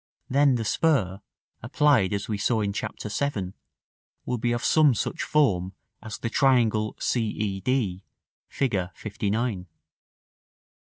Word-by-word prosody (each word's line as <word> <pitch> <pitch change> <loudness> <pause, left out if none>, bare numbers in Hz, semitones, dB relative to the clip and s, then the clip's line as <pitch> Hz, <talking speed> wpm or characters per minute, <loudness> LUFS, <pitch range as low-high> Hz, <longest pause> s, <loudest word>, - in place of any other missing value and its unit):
Then 140 0 +4
the 115 -2 -2
spur, 105 - +1 0.4
applied 130 -5 +2
as 100 -1 -2
we 105 -2 -3
saw 110 +2 +1
in 100 -1 -1
Chap. - - -4
VII., 105 -4 -3 0.7
will 125 -1 -2
be 120 +1 0
of 120 0 -2
some 150 -5 +4
such - - -3
form 95 -12 +1 0.3
as 110 -3 -7
the - - -4
triangle 115 -4 +2
c 120 - 0
e 105 -2 -2
d, 100 -4 -1 0.4
Fig. 135 -5 -1
LIX. 95 -3 0 0.2
§ 105 -1 -2
XI. - - -32
110 Hz, 140 wpm, -26 LUFS, 100-130 Hz, 0.7 s, Then